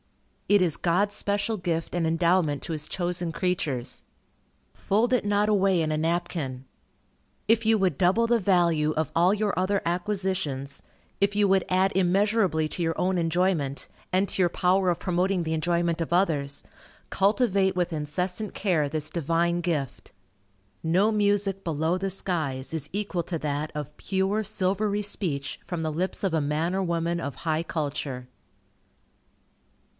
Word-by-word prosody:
It 205 Hz, -1 st, +5 dB
is 170 Hz, -4 st, +2 dB
God's 195 Hz, +4 st, +1 dB
special 205 Hz, +3 st, -1 dB
gift 165 Hz, -3 st, -2 dB
and 170 Hz, -2 st, +1 dB
endowment 165 Hz, -3 st, +2 dB
to 165 Hz, -, -3 dB
his 155 Hz, 0 st, -5 dB
chosen 175 Hz, -1 st, -2 dB
creatures. 160 Hz, -9 st, -2 dB, 0.7 s
Fold 225 Hz, +5 st, +1 dB
it 250 Hz, -, +2 dB
not 205 Hz, 0 st, +2 dB
away 195 Hz, -3 st, +3 dB
in 155 Hz, -1 st, 0 dB
a -, -, 0 dB
napkin. 160 Hz, -5 st, -2 dB, 0.8 s
If 225 Hz, +1 st, +3 dB
you 225 Hz, 0 st, +5 dB
would 185 Hz, -8 st, +1 dB
double 190 Hz, +6 st, +3 dB
the 235 Hz, 0 st, +3 dB
value 170 Hz, -6 st, +2 dB
of 160 Hz, -1 st, 0 dB
all 175 Hz, +3 st, +4 dB
your 210 Hz, -1 st, -1 dB
other 190 Hz, +2 st, +1 dB
acquisitions; 175 Hz, -7 st, -2 dB, 0.4 s
if 200 Hz, 0 st, +2 dB
you 205 Hz, -1 st, +4 dB
would 190 Hz, -1 st, +3 dB
add 185 Hz, +1 st, +2 dB
immeasurably 190 Hz, -3 st, +2 dB
to 175 Hz, -, -3 dB
your 165 Hz, 0 st, -1 dB
own 185 Hz, 0 st, +1 dB
enjoyment, 165 Hz, -4 st, 0 dB, 0.2 s
and 190 Hz, +2 st, +2 dB
to 190 Hz, -, -1 dB
your 175 Hz, -, +4 dB
power 185 Hz, +2 st, +2 dB
of 175 Hz, -, 0 dB
promoting 180 Hz, 0 st, 0 dB
the 160 Hz, 0 st, -2 dB
enjoyment 170 Hz, +1 st, 0 dB
of 165 Hz, -, -3 dB
others, 150 Hz, -6 st, +1 dB, 0.5 s
cultivate 195 Hz, -1 st, +2 dB
with 175 Hz, -1 st, 0 dB
incessant 180 Hz, +7 st, -3 dB
care 170 Hz, -8 st, +1 dB
this 155 Hz, 0 st, -2 dB
Divine 170 Hz, +2 st, 0 dB
gift. 155 Hz, -7 st, -3 dB, 0.7 s
No 185 Hz, +7 st, +3 dB
music 205 Hz, -2 st, +1 dB
below 160 Hz, +1 st, 0 dB
the 195 Hz, +1 st, -2 dB
skies 160 Hz, -8 st, -2 dB
is 150 Hz, -2 st, -4 dB
equal 200 Hz, -3 st, -2 dB
to 170 Hz, 0 st, -3 dB
that 150 Hz, +1 st, -2 dB
of 150 Hz, 0 st, -5 dB
pure, 195 Hz, +2 st, 0 dB
silvery 205 Hz, +1 st, 0 dB
speech 165 Hz, -9 st, -2 dB
from 175 Hz, -3 st, -4 dB
the 155 Hz, -1 st, -2 dB
lips 185 Hz, +6 st, -2 dB
of 185 Hz, -, 0 dB
a 160 Hz, -, +2 dB
man 155 Hz, +5 st, -1 dB
or 195 Hz, -, 0 dB
woman 170 Hz, -1 st, -1 dB
of 140 Hz, -, -4 dB
high 160 Hz, 0 st, +1 dB
culture. 145 Hz, -5 st, -4 dB
175 Hz, 160 wpm, -26 LUFS, 160-195 Hz, 0.8 s, It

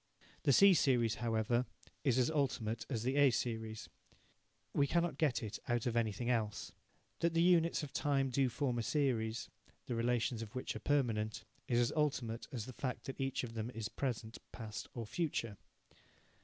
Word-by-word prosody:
The -, -, +3 dB
C 195 Hz, +8 st, +8 dB
series, 125 Hz, -8 st, +3 dB
however, 120 Hz, +1 st, +1 dB, 0.4 s
is 130 Hz, -4 st, +3 dB
as 130 Hz, +4 st, +3 dB
ultimate 120 Hz, -7 st, -1 dB
as 115 Hz, -5 st, -2 dB
the 130 Hz, +3 st, 0 dB
A 145 Hz, -1 st, +7 dB
series. 110 Hz, -2 st, -3 dB, 0.9 s
We 140 Hz, -, +3 dB
cannot 170 Hz, -2 st, 0 dB
get 135 Hz, -8 st, +2 dB
it 105 Hz, -1 st, -5 dB
out 120 Hz, -1 st, 0 dB
of 120 Hz, -2 st, 0 dB
anything 115 Hz, 0 st, 0 dB
else. 110 Hz, -4 st, -1 dB, 0.5 s
That 170 Hz, 0 st, +1 dB
the 165 Hz, -, +4 dB
units 170 Hz, -2 st, +4 dB
of 145 Hz, -2 st, -7 dB
time 135 Hz, -3 st, +1 dB
do 130 Hz, +1 st, +2 dB
form 125 Hz, -1 st, -1 dB
a -, -, +1 dB
series, 115 Hz, -4 st, 0 dB, 0.4 s
the -, -, -3 dB
relations 120 Hz, 0 st, 0 dB
of 115 Hz, +2 st, -8 dB
which 130 Hz, -, -3 dB
are -, -, -4 dB
permanent, 115 Hz, -7 st, 0 dB, 0.2 s
is 120 Hz, -, +2 dB
as 120 Hz, 0 st, +3 dB
ultimate 130 Hz, -7 st, -1 dB
as 115 Hz, -5 st, -4 dB
the 130 Hz, -, -8 dB
fact 125 Hz, +1 st, -3 dB
that 135 Hz, -, -5 dB
each 135 Hz, -1 st, -1 dB
of 115 Hz, -2 st, -6 dB
them 115 Hz, 0 st, -3 dB
is 115 Hz, -1 st, -3 dB
present, 115 Hz, -4 st, -3 dB
past, 110 Hz, -2 st, -6 dB
or 115 Hz, -2 st, -4 dB
future. 115 Hz, -6 st, -2 dB
120 Hz, 180 wpm, -36 LUFS, 115-140 Hz, 0.9 s, C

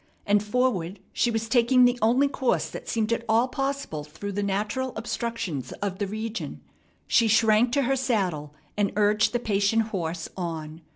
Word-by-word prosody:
And 205 Hz, 0 st, +3 dB
forward 210 Hz, -5 st, 0 dB
she 240 Hz, -, +2 dB
was 225 Hz, -1 st, -1 dB
taking 250 Hz, +1 st, +5 dB
the 245 Hz, 0 st, +2 dB
only 245 Hz, +6 st, +4 dB
course 265 Hz, -2 st, 0 dB
that -, -, -8 dB
seemed 225 Hz, 0 st, 0 dB
at 230 Hz, -, -2 dB
all 230 Hz, +3 st, +4 dB
possible 270 Hz, -, -3 dB
through 160 Hz, +7 st, -7 dB
the 200 Hz, +1 st, -2 dB
natural 210 Hz, +6 st, -1 dB
obstructions 225 Hz, -, -4 dB
of 195 Hz, -2 st, -4 dB
the 200 Hz, -, -1 dB
region. 215 Hz, -, -5 dB, 0.5 s
She 230 Hz, -, +3 dB
shrank 225 Hz, +1 st, +4 dB
to 280 Hz, 0 st, +3 dB
her 270 Hz, +2 st, +1 dB
saddle, 185 Hz, -, -1 dB, 0.2 s
and 205 Hz, -1 st, +1 dB
urged 210 Hz, +1 st, +3 dB
the 240 Hz, -, +1 dB
patient 220 Hz, 0 st, +1 dB
horse 165 Hz, -4 st, -3 dB
on. 160 Hz, -3 st, -5 dB
215 Hz, 170 wpm, -26 LUFS, 190-240 Hz, 0.5 s, taking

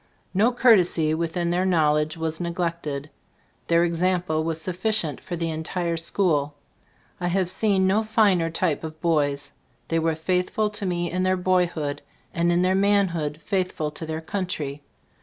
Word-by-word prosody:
No 215 Hz, +6 st, +3 dB
cour 245 Hz, -2 st, +6 dB
tesy 165 Hz, -4 st, +1 dB
within 170 Hz, +1 st, -1 dB
their 180 Hz, +1 st, +1 dB
knowledge 155 Hz, -3 st, +2 dB
was 160 Hz, +1 st, -3 dB
neg 170 Hz, 0 st, -4 dB
lected. 155 Hz, -5 st, -3 dB, 0.6 s
Their 170 Hz, 0 st, +4 dB
example 175 Hz, -2 st, 0 dB
was 165 Hz, 0 st, -2 dB
sufficient 185 Hz, -2 st, -1 dB
for 175 Hz, -, -5 dB
the 165 Hz, -1 st, -2 dB
entire 170 Hz, +2 st, -2 dB
school. 160 Hz, -4 st, 0 dB, 0.6 s
I 175 Hz, -, -1 dB
have 180 Hz, 0 st, 0 dB
seen 195 Hz, -1 st, +2 dB
no 195 Hz, +3 st, +3 dB
finer 210 Hz, -6 st, +2 dB
type 165 Hz, -2 st, -1 dB
of 155 Hz, 0 st, -7 dB
boys. 145 Hz, -4 st, 0 dB, 0.4 s
They 165 Hz, -, +1 dB
were 160 Hz, 0 st, +1 dB
faith 180 Hz, +3 st, 0 dB
ful 215 Hz, -1 st, 0 dB
to 205 Hz, -2 st, -3 dB
me 175 Hz, -1 st, -1 dB
in 180 Hz, +1 st, -1 dB
their 185 Hz, 0 st, +2 dB
boyhood, 175 Hz, -5 st, 0 dB, 0.3 s
and 170 Hz, +1 st, +1 dB
in 175 Hz, +1 st, +2 dB
their 185 Hz, +1 st, +3 dB
manhood 190 Hz, -7 st, +1 dB
faithful 185 Hz, -6 st, -1 dB
to 160 Hz, +1 st, -7 dB
their 160 Hz, 0 st, -3 dB
coun 185 Hz, +3 st, -3 dB
try. 145 Hz, -4 st, -4 dB
170 Hz, 170 wpm, -24 LUFS, 160-185 Hz, 0.6 s, cour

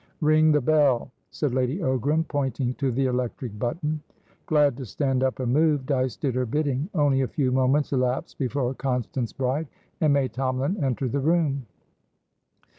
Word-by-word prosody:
"Ring 155 Hz, 0 st, +5 dB
the 150 Hz, -1 st, +3 dB
bell," 140 Hz, -3 st, +2 dB, 0.2 s
said 145 Hz, -5 st, -2 dB
Lady 130 Hz, +4 st, 0 dB
Ogram, 150 Hz, -, 0 dB
pointing 130 Hz, -3 st, -1 dB
to 135 Hz, 0 st, -1 dB
the 135 Hz, +3 st, 0 dB
electric 125 Hz, -3 st, -3 dB
button. 150 Hz, -, -2 dB, 0.5 s
Glad 145 Hz, -4 st, +3 dB
to 135 Hz, -, -6 dB
stand 135 Hz, +5 st, 0 dB
up 130 Hz, 0 st, 0 dB
and 125 Hz, -1 st, 0 dB
move, 150 Hz, -2 st, +2 dB
Dyce 130 Hz, -3 st, 0 dB
did 135 Hz, -4 st, -1 dB
her 125 Hz, 0 st, -1 dB
bidding. 145 Hz, -, -1 dB
Only 145 Hz, -4 st, +3 dB
a 130 Hz, -, +1 dB
few 130 Hz, -2 st, 0 dB
moments 130 Hz, +3 st, +2 dB
elapsed 125 Hz, -1 st, -1 dB
before 130 Hz, -1 st, -1 dB
Constance 125 Hz, -2 st, -2 dB
Bride 135 Hz, +4 st, -1 dB, 0.3 s
and 155 Hz, -2 st, +3 dB
May 140 Hz, -2 st, +2 dB
Tomalin 130 Hz, -, -2 dB
entered 130 Hz, -1 st, -1 dB
the 140 Hz, -, 0 dB
room. 145 Hz, -4 st, +1 dB
135 Hz, 165 wpm, -25 LUFS, 125-150 Hz, 0.5 s, Ring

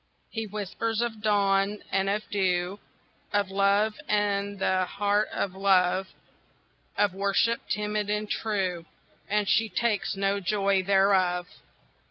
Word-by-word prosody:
He 225 Hz, -1 st, -4 dB
whispers 215 Hz, +2 st, -3 dB
of 230 Hz, -2 st, -2 dB
dawn 200 Hz, -1 st, +1 dB
and 195 Hz, +1 st, +1 dB
of 210 Hz, +2 st, -2 dB
dew, 185 Hz, -1 st, 0 dB, 0.5 s
Of 200 Hz, -2 st, 0 dB
love, 200 Hz, +2 st, +2 dB
and 205 Hz, -1 st, 0 dB
the 185 Hz, -1 st, +1 dB
heart 205 Hz, +2 st, 0 dB
of 190 Hz, -, -2 dB
love, 190 Hz, -1 st, +2 dB, 0.9 s
Of 205 Hz, -3 st, +2 dB
worship, 200 Hz, +4 st, +1 dB
timid 210 Hz, 0 st, -1 dB
and 210 Hz, 0 st, -1 dB
true, 190 Hz, -7 st, -2 dB, 0.4 s
And 210 Hz, 0 st, +1 dB
she 225 Hz, +3 st, +2 dB
takes 210 Hz, +1 st, 0 dB
no 195 Hz, +1 st, 0 dB
joy 195 Hz, 0 st, +1 dB
thereof. 190 Hz, -2 st, +2 dB
200 Hz, 125 wpm, -27 LUFS, 195-210 Hz, 0.9 s, love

